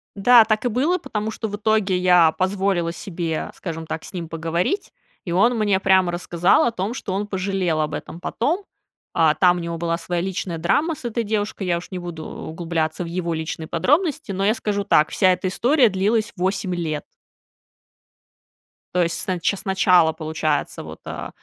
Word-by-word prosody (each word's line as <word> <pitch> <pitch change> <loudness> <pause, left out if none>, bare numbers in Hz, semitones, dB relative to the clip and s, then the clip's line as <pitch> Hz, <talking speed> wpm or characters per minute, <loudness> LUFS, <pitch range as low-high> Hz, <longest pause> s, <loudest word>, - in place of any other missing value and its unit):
Да, 235 +3 +7
так 215 +2 0
и - - +2
было, 285 +11 +1
потому 220 - -4
что 220 0 -4
в 205 - -4
итоге 210 -3 +1
я 180 -3 +5
позволила 190 -2 0
себе, 170 -2 -4
скажем 165 -3 -6
так, 160 - -5
с - - -11
ним 175 -3 -5
поговорить, 165 - -2 0.3
и 175 - -4
он 230 +7 +3
мне 205 -3 +2
прямо 190 -2 +3
рассказал 175 0 +2
о 240 - +2
том, 205 +1 -3
что 205 -6 -5
он 205 +2 -2
пожалел 190 -4 -1
об 150 -1 -2
этом 160 - -6
потом. 310 - -1 0.5
А, 160 -2 +4
там 180 +1 +4
у - - -3
него 170 -1 -4
была 170 0 -1
своя 175 0 -2
личная 185 -2 -3
драма 290 - +1
с - - -14
этой 235 -1 -2
девушкой, 205 -2 -2
я 175 -1 +2
уж 170 - -9
не 185 - -4
буду 170 -3 -7
углубляться 165 0 -3
в - - -6
его 170 0 -2
личные 160 0 -4
подробности, 285 - +1
но 195 +1 -1
я 215 - +4
скажу 210 -3 -2
так: 155 -6 +3
вся 185 -1 +3
эта 180 +1 -3
история 245 +6 +3
длилась 210 +3 0
8 190 0 -1
лет. 155 -4 -3 1.9
То 180 - +3
есть, 165 0 -1
с - - -4
нач 185 0 0
с 200 - -8
начала, 180 -4 +4
получается, 155 -2 -2
вот, - - -10
э, - - -6
185 Hz, 190 wpm, -22 LUFS, 170-210 Hz, 1.9 s, Да